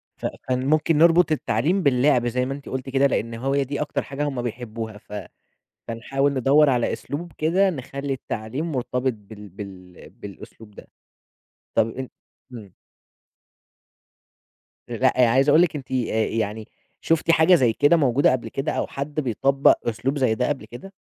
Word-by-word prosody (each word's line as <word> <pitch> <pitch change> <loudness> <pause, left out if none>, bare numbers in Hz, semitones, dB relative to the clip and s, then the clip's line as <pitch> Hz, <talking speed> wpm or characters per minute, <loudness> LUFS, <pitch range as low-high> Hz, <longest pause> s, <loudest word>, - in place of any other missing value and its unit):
ف - - -9 0.2
فممكن 150 +5 +1
نربُط 170 +1 +5
التعليم 155 - 0
باللعب 125 -2 +3
زي 125 +1 0
ما 135 - -3
أنتِ 140 0 -9
قُلتِ 130 0 -5
كده، 135 +1 +3
لأن 115 -3 -2
هو 135 +4 -2
هي 140 0 +2
دي 140 +2 -4
أكتر 150 - -2
حاجة 140 +1 -5
هُم 135 -4 -3
بيحبّوها، 115 -2 -6
ف 105 - -15 0.8
فنحاول 135 +5 -1
ندوّر 140 +3 +4
على 125 -2 +1
أسلوب 165 +4 -6
كده 185 +5 +2
نخلّي 140 -2 -5
التعليم 130 +5 -4
مرتبِط 125 0 -1
بال 105 -1 -13
بال 90 -3 -11
بالأسلوب 105 +2 -12
ده. - - -13 0.9
طَب 110 - +3
أن 130 +3 -6 0.4
إمم. 105 -6 -10 2.2
أ - - -5
لأ، 125 0 +3
عايز 135 +4 +3
أقول 155 +3 +6
لِك 175 -3 +1
أنتِ 135 -3 -8
آآ - - 0 0.3
يعني 110 -1 -3 0.3
شُفتِ 165 0 +2
حاجة 165 +2 +5
زي 125 -8 +3
كده 145 +8 +4
موجودة 140 -2 +3
قبل 120 -3 -2
كده 135 +6 -3
أو - - -2
حد 145 +2 -4
بيطبّق 135 +1 +3
أسلوب 120 +6 -2
زي 130 -5 +2
ده 125 +2 0
قبل 145 -2 -3
كده؟ 190 +11 -11
130 Hz, 160 wpm, -23 LUFS, 115-145 Hz, 2.2 s, أقول